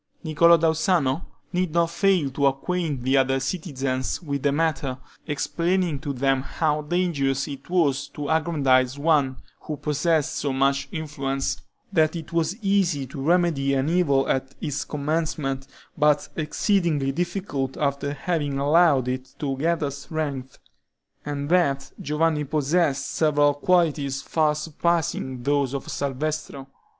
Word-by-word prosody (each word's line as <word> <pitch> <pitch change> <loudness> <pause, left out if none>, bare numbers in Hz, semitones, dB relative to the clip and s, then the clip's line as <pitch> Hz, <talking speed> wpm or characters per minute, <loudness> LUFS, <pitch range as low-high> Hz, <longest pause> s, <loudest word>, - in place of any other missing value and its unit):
Niccolo 170 +1 +5
da 165 0 +3
Uzzano 160 -3 +1 0.3
did 180 -3 0
not 170 -1 +2
fail 180 -7 +2
to 140 +1 +2
acquaint 145 0 -1
the 135 +2 +3
other 135 0 +2
citizens 135 -4 -2
with 140 -5 -3
the 145 - +2
matter, 145 -4 0 0.3
explaining 170 +2 0
to 140 - -4
them 135 0 +1
how 150 +2 -1
dangerous 150 -5 0
it 140 +1 -8
was 145 -6 +1
to 145 -1 -6
aggrandize 140 -5 +2
one 145 -3 +2 0.2
who 150 - -6
possessed 150 +1 0
so 140 - -1
much 135 +1 +1
influence; 140 -5 -3 0.3
that 155 +1 +3
it 165 -1 -7
was 170 +3 0
easy 190 -8 +2
to 135 +1 -8
remedy 155 -4 +2
an 135 +3 +1
evil 150 -6 +2
at 135 0 -1
its 145 -2 -3
commencement, 150 -2 -2 0.3
but 150 -1 +2
exceedingly 155 -3 +1
difficult 170 -5 -3
after 140 -1 -1
having 145 -2 -2
allowed 145 -2 +4
it 130 0 -4
to 140 -2 -2
gather 160 -1 0
strength; 140 -2 -5 0.7
and 145 -1 -3
that 140 -6 +2
Giovanni 150 0 0
possessed 145 -1 +1
several 145 -2 +3
qualities 145 -4 +1
far 155 -2 +1
surpassing 150 -4 -1
those 140 -1 +1
of 135 - -5
Salvestro. 140 0 -3
145 Hz, 135 wpm, -24 LUFS, 135-165 Hz, 0.7 s, Niccolo